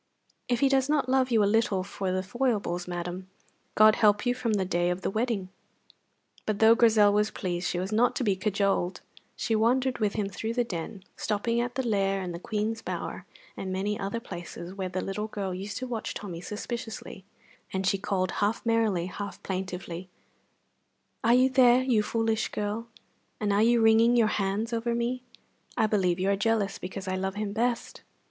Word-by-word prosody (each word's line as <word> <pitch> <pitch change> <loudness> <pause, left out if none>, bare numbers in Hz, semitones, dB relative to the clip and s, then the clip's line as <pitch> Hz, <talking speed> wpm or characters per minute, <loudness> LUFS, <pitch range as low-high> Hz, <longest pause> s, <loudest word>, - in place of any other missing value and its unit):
If 245 -1 +1
he 275 - +5
does 270 0 +2
not 295 -4 +2
love 260 0 +3
you 225 -3 +4
a - - +4
little 205 -2 +2
for 190 -1 -3
the 185 0 -1
foibles, 205 -5 -1
madam, 175 +1 -5 0.5
God 215 0 +6
help 210 +1 +4
you 245 - +3
from 235 -3 -1
the 195 -2 +1
day 175 -1 +1
of 180 +1 -2
the - - -1
wedding. 215 -4 -1 1.0
But 215 -2 0
though 220 +2 +7
Grizel 220 -3 +5
was 210 +1 +2
pleased, 180 -2 -3
she - - -1
was 185 +3 -3
not 230 +3 +3
to - - -1
be 200 -4 +2
cajoled. 195 -2 0 0.3
She 225 - 0
wandered 250 +4 +2
with 210 -2 +1
him 210 -2 -1
through 220 +3 -4
the 245 - +2
Den, 190 -1 -6
stopping 230 +3 0
at 245 0 -3
the 260 -2 -1
Lair, 195 -2 +1
and 180 -1 -4
the 170 - -6
Queen's 215 +4 -2
Bower, - - -5 0.3
and 190 - -5
many 200 +3 -1
other 200 +4 -2
places 175 -4 -8
where 190 -1 -4
the 185 0 -3
little 210 +2 -3
girl 200 -3 -4
used 195 +3 -5
to 255 - -4
watch 235 -3 -4
Tommy 175 -5 -6
suspiciously; 215 0 -6 0.5
and 190 0 -2
she 195 +1 +2
called, 185 -2 -1
half 210 +4 -1
merrily, 225 -6 +2
half 200 +2 -7
plaintively: 185 -1 -5 1.1
"Are 235 +1 +5
you 255 +1 +5
there, 255 -1 +5
you 245 -5 +3
foolish 225 +1 0
girl, 210 +3 -3 0.5
and 205 -2 +1
are 205 - +3
you 235 +1 +4
wringing 225 +2 +5
your 225 -3 +4
hands 210 +4 -1
over 235 +1 0
me? 240 +2 -1 0.6
I - - +4
believe 190 -5 +1
you 190 +2 +2
are - - +3
jealous 205 -1 0
because 190 +1 -6
I 185 - -1
love 190 +1 -2
him 205 -1 -3
best." 235 +2 -1
210 Hz, 195 wpm, -28 LUFS, 190-230 Hz, 1.1 s, though